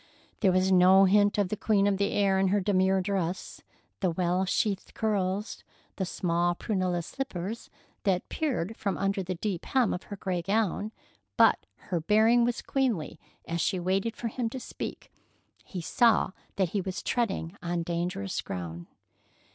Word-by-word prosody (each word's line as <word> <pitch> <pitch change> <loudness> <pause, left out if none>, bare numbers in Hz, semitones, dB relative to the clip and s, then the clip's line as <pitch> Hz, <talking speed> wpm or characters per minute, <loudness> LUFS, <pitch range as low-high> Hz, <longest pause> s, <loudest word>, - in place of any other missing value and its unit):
There 190 - +4
was 185 +1 +2
no 190 +1 +7
hint 205 +2 +4
of 200 -3 +1
the 215 - -1
queen 205 -1 +2
of 200 -1 +2
the 200 +1 0
air 195 -2 +3
in 195 - +3
her 200 +2 +2
demure 190 -1 +2
dress, 185 -2 -3 0.4
the 190 - +1
well 180 +2 0
sheathed 195 +1 -1
curls, 205 -1 -1 0.3
the 190 - -1
small 175 -1 0
prunella 185 -4 -1
slippers 220 -2 -5 0.3
that 190 -3 0
peered 235 - -2
from 200 -3 -2
under 195 0 0
the 185 0 -3
deep 185 -1 -3
hem 255 -5 +2
of 180 - -5
her 205 - -7
gray 185 -3 -2
gown, 210 +2 0 0.5
but - - +4 0.2
her 175 - +1
bearing 220 +6 +4
was 240 0 -1
queenly 220 - -1 0.3
as 170 0 -1
she 185 - 0
waited 195 +5 -1
for 235 - -3
him 235 0 -2
to 260 - -6
speak. - - -7 0.5
He 185 - -6
saw 225 +5 +3 0.2
that 190 -3 +1
he 200 +3 -1
was 185 0 -5
treading 195 -7 -1
on 170 0 -2
dangerous 170 - -2
ground. 85 -2 -6
190 Hz, 165 wpm, -28 LUFS, 180-210 Hz, 0.5 s, no